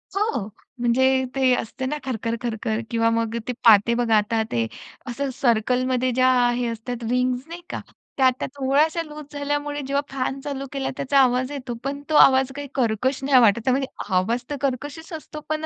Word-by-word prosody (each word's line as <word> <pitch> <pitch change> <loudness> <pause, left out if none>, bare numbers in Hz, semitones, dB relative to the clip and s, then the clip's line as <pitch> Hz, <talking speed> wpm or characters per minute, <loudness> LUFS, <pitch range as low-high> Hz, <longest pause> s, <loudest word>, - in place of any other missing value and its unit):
हो, 410 - 0 0.3
म्हणजे 260 +2 +3
ते 260 -2 +3
असते 245 +2 -4
ना 295 +3 -2
खरखर, 230 -3 -2
खरखर. 225 -2 -2
किंवा 230 -1 +2
मग 230 0 -1
ते 250 - -1
पाते 220 +1 +7
बघा, 235 -2 +2
आता 215 +2 +1
ते 115 -1 +1 0.4
असं 275 +3 -2
सर्कलमध्ये 250 +1 +1
ज्या 255 +1 +3 0.3
हे 245 0 -1
असतात 235 +1 -5
रिंग्स 250 +2 0
नाही 340 +1 -8
का, - - -4 0.4
त्या 265 - +4
आता 255 -1 +2
थोड्याश्या 290 +5 +2
लूज 300 -1 -9
झाल्यामुळे 290 0 -2
जेव्हा 280 +1 +1
फॅन 265 0 -2
चालू 275 -1 -4
केला 275 -1 -2
त्याचा 275 +1 +2
आवाज 255 0 +2
येतो, 265 -4 -5
पण 280 +1 -3
तो 310 - +1
आवाज 265 -2 +6
काही 285 0 -6
कर्कश 255 +2 0
नाही 270 -1 +5
वाटत. 225 -1 +5
त्यामध्ये 265 +1 +1 0.3
आवाज 225 +7 +1
तर 290 - -2
कर्कशच 285 +5 -3
असतो, 310 -1 -7
पण 310 0 -1
260 Hz, 180 wpm, -23 LUFS, 235-280 Hz, 0.4 s, पाते